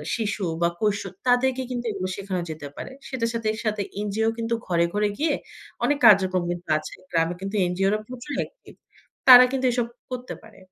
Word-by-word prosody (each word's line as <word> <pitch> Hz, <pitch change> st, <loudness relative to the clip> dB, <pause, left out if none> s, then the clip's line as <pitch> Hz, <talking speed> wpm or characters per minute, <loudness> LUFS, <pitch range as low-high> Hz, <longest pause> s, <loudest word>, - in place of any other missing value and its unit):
শিশু 210 Hz, -3 st, -2 dB, 0.2 s
বা 170 Hz, -, +4 dB
কিশোর 205 Hz, -2 st, 0 dB, 0.2 s
তাদেরকে 260 Hz, +1 st, +3 dB
কিন্তু 245 Hz, -1 st, -3 dB
এগুলো 185 Hz, -2 st, -3 dB
শেখানো 190 Hz, -2 st, -3 dB
যেতে 155 Hz, -2 st, -6 dB
পারে। -, -, -7 dB, 0.2 s
সেটার 240 Hz, -3 st, -2 dB
সাথে 230 Hz, -1 st, -2 dB
এর 220 Hz, -, -7 dB
সাথে 215 Hz, -1 st, 0 dB, 0.2 s
এনজিও 215 Hz, +2 st, 0 dB
কিন্তু 230 Hz, 0 st, -2 dB
ঘরে, 170 Hz, -1 st, +2 dB
ঘরে 210 Hz, 0 st, +1 dB
গিয়ে 305 Hz, -1 st, +1 dB, 0.5 s
অনেক 290 Hz, 0 st, +2 dB
কার্যকর্মী 185 Hz, -3 st, +4 dB
তো -, -, -2 dB
আছে। 155 Hz, -, -7 dB, 0.2 s
গ্রামে 165 Hz, +1 st, +1 dB
কিন্তু 195 Hz, +2 st, -4 dB
এনজিওরা 195 Hz, +4 st, +1 dB
প্রচুর 255 Hz, +3 st, -7 dB
অ্যাকটিভ। -, -, -7 dB, 0.5 s
তারা 250 Hz, 0 st, +11 dB
কিন্তু 265 Hz, -1 st, -1 dB
এসব 240 Hz, -1 st, 0 dB, 0.2 s
করতে 250 Hz, 0 st, -5 dB
পারে। 220 Hz, -1 st, -16 dB
215 Hz, 180 wpm, -24 LUFS, 185-245 Hz, 0.5 s, তারা